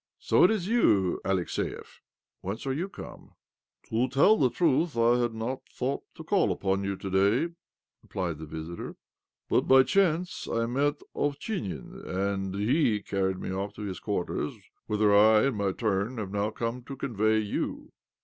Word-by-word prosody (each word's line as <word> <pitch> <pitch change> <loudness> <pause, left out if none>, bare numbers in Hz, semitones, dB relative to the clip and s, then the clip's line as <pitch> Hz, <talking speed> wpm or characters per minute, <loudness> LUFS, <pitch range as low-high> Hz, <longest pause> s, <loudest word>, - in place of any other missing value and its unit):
"So - - +3
it - - +7
is 210 -5 0
you, 105 - +3
Alexiev? 95 -2 -3 0.4
Whence 100 +7 -5
are 135 - 0
you 175 +8 -3
come? - - -11 0.2
" - - -66
" - - -33
To 115 +3 +1
tell 140 +11 +5
the 130 -10 +3
truth, 160 -1 +1
I 120 +1 +4
had 120 -2 0
not 120 +4 -3
thought 135 +2 -2
to - - -9
call - - +2
upon 95 0 -1
you 100 0 -2
to 100 - -7
day," 105 - +2 0.5
replied 85 -5 -4
the 80 - -7
visitor, 80 +2 -7 0.3
" - - -65
but - - +2
by 130 0 +7
chance 180 0 +1
I 115 0 +1
met 145 +5 0
Ovchinin, 145 - -3
and 95 0 -2
he 110 0 +2
carried 95 -1 -1
me - - -4
off 100 +2 -4
to 105 - -7
his 95 -4 -5
quarters, - - -2 0.3
whither 105 -1 +3
I, 110 +2 +6
in 135 - +1
my 100 -2 0
turn, 105 +3 -1
have 100 -4 -4
now 100 +1 0
come 115 +3 -4
to 140 - -7
convey 110 -5 +1
you." 105 -2 -3
110 Hz, 180 wpm, -28 LUFS, 100-135 Hz, 0.5 s, it